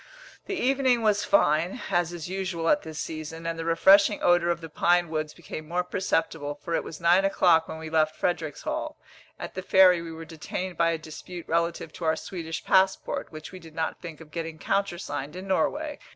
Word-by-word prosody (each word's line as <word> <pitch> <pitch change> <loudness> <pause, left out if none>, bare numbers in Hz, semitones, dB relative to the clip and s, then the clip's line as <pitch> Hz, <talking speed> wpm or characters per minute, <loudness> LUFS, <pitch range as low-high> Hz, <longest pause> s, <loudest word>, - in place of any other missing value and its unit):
The 395 - -2
evening 260 -5 +2
was 210 -2 +3
fine, 175 - +2
as 175 -1 +1
is 175 -2 -6
usual 185 -3 -2
at 295 - +4
this 155 -1 -8
season, 160 +1 -6
and 165 0 -3
the - - -2
refreshing 195 +5 +5
odour 175 -1 +4
of 170 - 0
the 165 - -8
pine 175 +2 +2
woods 155 -1 -3
became 155 -2 -8
more 175 +2 0
perceptible, 165 -5 -1
for 170 +3 -6
it - - +1
was 155 - -8
nine 175 +3 +4
o'clock 175 -4 +4
when - - -6
we 160 0 -7
left 155 -1 +2
Fredericshall. 165 -4 -2 0.4
At - - -7
the 185 - -4
ferry 185 -2 +6
we 165 -1 -7
were 165 0 -8
detained 175 +3 -5
by 165 0 +3
a 165 - 0
dispute 165 +2 -9
relative 170 -1 -1
to 170 - -6
our 160 0 +3
Swedish 165 -1 -6
passport, 190 0 +2
which 155 -1 -9
we 185 - -9
did 165 -2 -14
not 160 -1 -2
think 165 -4 -8
of 155 -2 -14
getting 165 -1 -5
countersigned 155 -5 -2
in 185 +1 -7
Norway. 290 - 0
170 Hz, 200 wpm, -27 LUFS, 160-185 Hz, 0.4 s, ferry